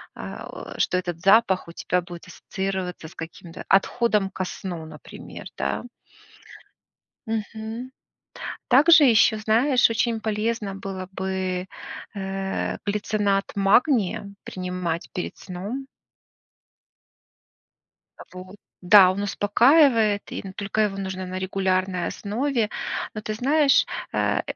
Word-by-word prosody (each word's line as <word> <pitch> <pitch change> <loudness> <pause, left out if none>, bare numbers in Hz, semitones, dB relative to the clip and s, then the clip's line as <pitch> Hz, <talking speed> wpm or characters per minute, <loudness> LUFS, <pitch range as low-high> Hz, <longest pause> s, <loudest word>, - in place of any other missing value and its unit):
а, - - -8
о - - -10
что 185 - +2
этот 175 -2 -3
запах 195 -2 +4
у 170 - -9
тебя 180 +1 -1
будет 175 0 -11
ассоциироваться 190 -3 -4
с - - -15
каким-то 165 +1 -9
отходом 210 0 +2
ко 190 -1 -4
сну, 175 -3 -6
например, 155 -2 -11
да. 70 +1 -2 1.4
Мгм. 220 +3 -4 0.8
Также 300 +4 +7
ещё, 225 -3 +5
знаешь, 240 +5 +3
очень 230 0 0
полезно 215 -1 -2
было 195 -1 -6
бы, 190 -1 -2 0.5
э, 195 -1 -3
глицинат 205 -1 0
магния 200 - +2
принимать 180 -2 -4
перед 180 - -4
сном. 205 +9 -6 2.3
Э, - - -9
вот, 185 +2 -10 0.3
да, 185 0 +8
он 195 +2 -2
успокаивает, 220 +1 +3
и - - -4
н 190 - -7
только 200 +2 -3
его 200 -2 0
нужно 190 -1 -4
на 185 0 -4
регулярной 185 -1 0
основе. 230 +2 -1 0.5
Но 215 - -4
ты 215 0 -3
знаешь, 285 +4 +3 0.3
э, - - +1
195 Hz, 115 wpm, -24 LUFS, 185-225 Hz, 2.3 s, да